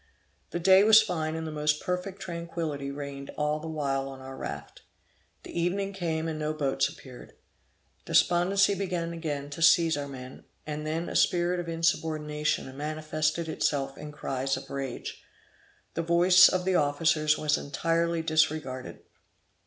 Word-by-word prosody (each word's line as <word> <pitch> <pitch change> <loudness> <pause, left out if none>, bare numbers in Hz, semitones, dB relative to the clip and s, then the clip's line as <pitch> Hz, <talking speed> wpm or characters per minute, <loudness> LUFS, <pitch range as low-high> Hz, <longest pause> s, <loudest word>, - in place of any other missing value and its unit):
The 175 - -3
day 190 +2 +6
was 220 0 +8
fine, 160 -6 -2
and 160 0 -4
the 160 - -4
most 150 0 0
perfect 180 +2 -4
tranquility 165 -5 -4
reigned 140 -1 -7
all 150 0 0
the 160 - -7
while 135 -3 -2
on 135 -1 -9
our 130 0 -9
raft. - - -7 0.6
The - - -10
evening 195 +4 -1
came 165 -4 -2
and 155 -1 -4
no 155 0 -1
boats 140 -3 0
appeared. 130 -2 -13 0.7
Despondency 190 +3 +3
began 175 -3 -2
again 145 -4 -4
to 155 - -7
seize 165 -1 +5
our 145 -1 -4
men, 130 -2 -10 0.2
and 150 0 -4
then 165 +2 -2
a - - -6
spirit 175 0 +2
of 170 -1 -4
insubordination 155 -4 -1
manifested 155 +2 -2
itself 140 -3 -1
in 150 +1 -8
cries 135 -2 -2
of - - -10
rage. 135 -3 -5 0.7
The - - -1
voice 175 +2 +6
of 180 -1 -1
the 190 - +2
officers 155 0 +2
was 150 0 +1
entirely 165 +3 -1
disregarded. 155 -5 -1
155 Hz, 155 wpm, -28 LUFS, 145-170 Hz, 0.7 s, was